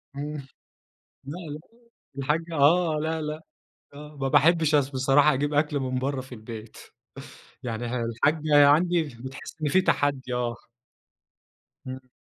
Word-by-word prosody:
إمم 145 -1 -5 0.8
لأ، 150 +6 -6
لأ، 150 +1 -6 0.6
الحاجّة 160 +5 -1
آه 155 +2 +4
لأ، 160 0 -2
لأ، 155 +1 -4 0.5
آه، 150 +1 -11
ما 135 -1 -1
باحبش 160 +1 +4
أص 140 -2 +3
بصراحة 135 +2 +4
أجيب 145 +2 -1
أكل 150 -1 +1
من 130 -1 -2
برّه 135 +1 -2
في 130 -1 -10
البيت، 110 0 -9 0.9
يعني 120 0 -3 0.2
الحاجّة 145 +5 +3
عندي 170 +3 +4
بتحس 130 -1 -9
إن 150 - 0
في 185 +5 +4
تحدي 140 -6 0
آه. 120 -1 -1 1.3
إمم. 130 0 -8
145 Hz, 135 wpm, -26 LUFS, 130-155 Hz, 1.3 s, آه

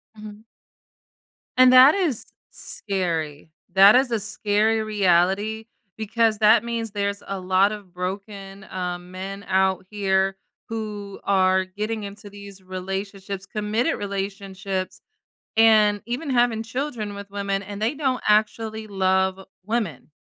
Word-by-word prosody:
Mhm. 210 0 -11 1.1
And 255 0 +7
that 260 +4 +8
is 335 - -1 0.3
scary. 165 -7 -3 0.2
That 195 +3 +8
is 255 -1 +3
a 230 - +1
scary 215 +1 0
reality, 205 +2 +1 0.3
because 220 0 +1
that 215 +1 +5
means 230 -2 -3
there's 200 0 -2
a 195 -1 -4
lot 185 +2 +3
of 205 -4 -9
broken, 195 +1 -6
um, 180 -1 -5
men 195 +2 -7
out 190 -1 +1
here 195 -2 +1 0.3
who 210 -3 -6
are 190 -1 +3
getting 210 +3 -4
into 205 +1 -9
these 200 -1 -12
relationships, 190 +1 -5
committed 215 +8 -1
relationships, 195 -1 -4 0.6
and 215 -2 +5
even 255 +5 -3
having 240 -3 +2
children 230 -3 -4
with 200 0 -9
women, 200 -1 -2
and 205 +1 -8
they 225 +6 0
don't 270 -4 -1
actually 220 +1 +1
love 190 -1 +1 0.3
women. 210 - -3
205 Hz, 125 wpm, -23 LUFS, 190-220 Hz, 1.1 s, that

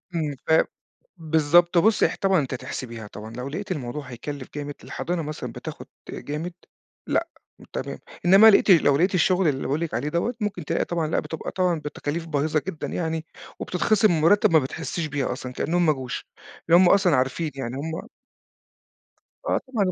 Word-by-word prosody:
إمم 150 -3 -1
فاه 160 0 +5 0.5
بالضبط. 165 +2 +3
بُصّي، 210 +5 +4
اح - - 0
طبعًا 195 -2 +4
أنتِ 135 -2 -3
هتحسبيها 125 -4 -6
طبعًا، 105 +1 -9
لو 125 +2 -5
لقيتِ 195 +7 -5
الموضوع 145 -3 -4
هيكَلّف 130 +2 -6
جامد 145 0 -4
الحضانة 175 0 -3
مثلًا 150 0 -5
بتاخُد - - -8 0.2
جامد 155 +5 -5 0.5
لأ، - - +1 0.5
تمام. - - -4 0.3
إنّما 195 +5 +9
لقيتِ 200 -1 +5
لو 145 -5 +5
لقيتِ 185 +5 +2
الشُغل 180 +1 +3
اللي 135 -3 0
باقول 145 +3 0
لِك 170 - -3
عليه 150 - -1
دوّة، 170 +10 -1
ممكن 200 -6 -3
تلاقي - - 0
طبعًا 170 -2 -1
لأ 155 - +1
بتبقى 160 - -5
طبعًا 180 -3 +1
بتكاليف 150 +2 -4
باهظة 155 0 0
جدًا 165 -5 -4
يعني 160 -2 -3 0.3
وبتتخصم 215 +3 +2
من 170 - +2
المُرتّب 165 +6 +4
ما 160 - +6
بتحسّيش 160 +4 -4
بيها 145 -2 -2
أصلًا، 125 0 -6
كإنّهم 175 +6 +1
ما 155 - +4
جوش. 130 -3 -6 0.4
لإن 170 +1 +7
هم 185 -1 +6
أصلًا 185 -5 +4
عارفين 135 +5 0
يعني، 130 -2 -4
هم 160 +3 -5 1.4
آه - - +2
طبعًا، 235 -6 0
160 Hz, 175 wpm, -24 LUFS, 145-175 Hz, 1.4 s, إنّما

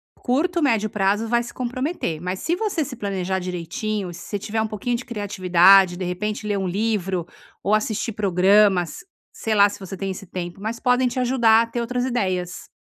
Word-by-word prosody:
curto, 335 +8 0
médio 225 -8 +2
prazo 205 +2 0
vai 235 +1 +1
se 240 - -9
comprometer. 255 - -3
Mas, 180 +3 -4
se 340 - 0
você 400 -5 -1
se 275 -3 -7
planejar 190 -4 -2
direitinho, 180 +2 -4
se 170 - -10
você 205 - -4
tiver 220 +2 -2
pouquinho 225 +3 -2
de 240 - -8
criatividade, 190 -4 +4
de 185 - -5
repente 210 +4 -3
ler 205 -1 0
um 190 -1 -2
livro 190 -3 -1 0.4
ou 210 - +3
assistir 215 +1 -1
programas, 195 - +3 0.3
sei 225 - -3
lá 205 -1 +6
se 205 - -9
você 195 -1 -7
tem 195 +1 -4
esse 190 +1 -6
tempo, 175 0 -6
mas 220 +3 -4
podem 250 0 +2
te 250 - -3
ajudar 235 -3 +4
a 230 - -1
ter 240 - -4
outras 245 +1 -1
ideias. 185 -8 -2
210 Hz, 190 wpm, -22 LUFS, 185-235 Hz, 0.4 s, lá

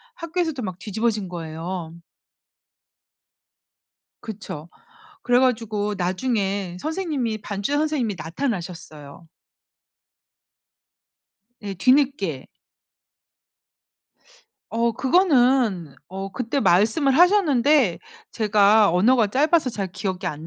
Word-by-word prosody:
학교에서도 335 -4 -3
막 185 -4 -5
뒤집어진 215 -2 -2
거예요. 165 0 -6 2.3
그쵸. 195 -7 -8 0.5
그래 245 0 +3
가지고 220 -5 0
나중에 195 -1 -2
선생님이 305 - -2
반주자 205 +9 -2
선생님이 290 -10 -1
나타나셨어요. 165 - -6 2.3
예 200 -2 -6
뒤늦게. 255 - +1 2.2
어 230 0 0
그거는 255 - +2
어 195 +1 -6
그때 250 +3 -2
말씀을 230 - +3
하셨는데 300 - +4 0.3
제가 210 -2 +4
언어가 220 +5 +3
짧아서 295 - +2
잘 200 -4 -4
기억이 190 -1 -4
안 155 0 -5
215 Hz, 210 characters per minute, -23 LUFS, 185-265 Hz, 2.3 s, 하셨는데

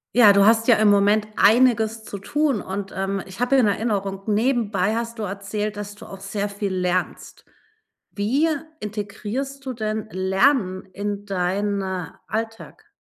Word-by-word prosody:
Ja, 215 -5 +8
du 200 0 +5
hast 225 +1 +4
ja 235 - +7
im 215 0 +4
Moment 205 +1 +4
einiges 225 0 +4
zu 205 - -7
tun 285 +1 0
und, 195 0 -5
ähm, 195 0 -2
ich 190 +4 -11
habe 245 +2 +2
in 255 -4 +5
Erinnerung, 200 -2 -1
nebenbei 215 -3 +1
hast 230 0 -4
du - - -2
erzählt, 205 +1 -4
dass 205 0 -6
du - - -12
auch 195 - -10
sehr 200 +1 -3
viel 200 -1 -3
lernst. 180 0 -2 0.7
Wie 260 +11 +1 0.3
integrierst 215 +7 -5
du 260 - -3
denn 215 -1 -3
Lernen 190 +1 +2
in 205 +1 -4
dein, 200 +1 -1
äh, 190 -3 -3 0.2
Alltag? 225 - -6
205 Hz, 155 wpm, -23 LUFS, 195-225 Hz, 0.7 s, Ja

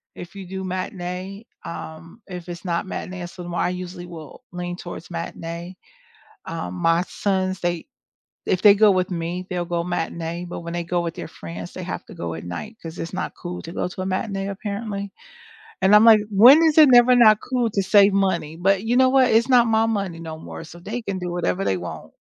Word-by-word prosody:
if 175 +3 -10
you 195 -2 -8
do 190 +1 -5
matinee, 185 +2 -5 0.2
um, 165 +5 -9
if 180 -2 -8
it's 175 +2 -8
not 170 +1 -1
matinee 185 -1 -6
so 175 0 -8
I 175 - +1
usually 180 0 -6
will 165 - -11
lean 175 0 -4
towards 175 -1 -9
matinee. 170 +1 -6 0.7
Um, 90 - -5
my 165 - +2
sons, 190 -1 -1
they 175 - -2 0.6
if 185 - 0
they 205 -2 +9
go 210 +1 +5
with 185 -1 +1
me 175 +1 -3
they'll 175 -1 -2
go 170 -1 -2
matinee 170 0 -3
but 175 - -6
when 170 0 -6
they 175 - -2
go 175 +1 -1
with 170 -1 -3
their - - -7
friends 85 +1 -9
they - - -6
have - - -5
to - - -12
go 85 -1 -4
at 80 - -7
night 215 - -6
'cause 165 +1 -8
it's 165 - -6
not - - -3
cool 175 0 -6
to 165 - -9
go - - -2
to 185 +1 -7
a - - -3
matinee 195 +1 -2
apparently. 200 0 -5 0.7
And 195 +2 +5
I'm 210 +2 +8
like 220 -2 +8
"When 245 +10 +8
is 320 -1 +3
it 305 -2 +9
never 245 +1 +7
not 215 -3 +7
cool 245 -3 -1
to 200 -1 0
save 200 +1 +5
money?" 180 -5 0
but 195 +3 +1
you 240 +2 +1
know 260 0 +6
what, 260 -1 +4
it's 230 +3 +3
not 245 -2 +5
my 225 0 +3
money 200 -6 -2
no 160 -1 -7
more 165 - -9
so 165 +1 -12
they 215 +7 -5
can 195 -3 -3
do 180 -1 -4
whatever 175 +2 -1
they 95 - +1
want. 90 -1 -8
185 Hz, 215 wpm, -23 LUFS, 170-205 Hz, 0.7 s, they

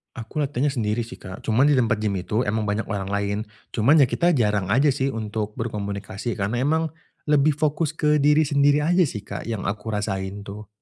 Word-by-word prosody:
Aku 115 +4 -7
latihannya 145 -1 0
sendiri 115 -3 -1
sih, 120 +2 -10
Kak. 95 0 -9
Cuman 120 +5 +3
di 145 - +4
tempat 115 -4 +2
gym 105 -2 -1
itu 100 +6 -1
emang 110 +2 0
banyak 105 +1 -1
orang 100 -2 -3
lain. 100 0 -1 0.4
Cuman 130 +8 +4
ya 140 - +6
kita 175 +6 +1
jarang 105 - +1
aja 135 +7 +4
sih 135 0 0
untuk 105 -2 -4
berkomunikasi, 100 0 -4
karena 110 +6 -1
emang 160 +3 +2 0.4
lebih 150 0 +4
fokus 150 +1 0
ke 150 -2 +1
diri 150 +1 +4
sendiri 145 0 +3
aja 175 +5 +3
sih, 105 - -3
Kak, - - -5
yang 110 -3 -4
aku 105 +2 -3
rasain 100 -1 -3
tuh. 105 +2 -8
115 Hz, 200 wpm, -23 LUFS, 105-145 Hz, 0.4 s, ya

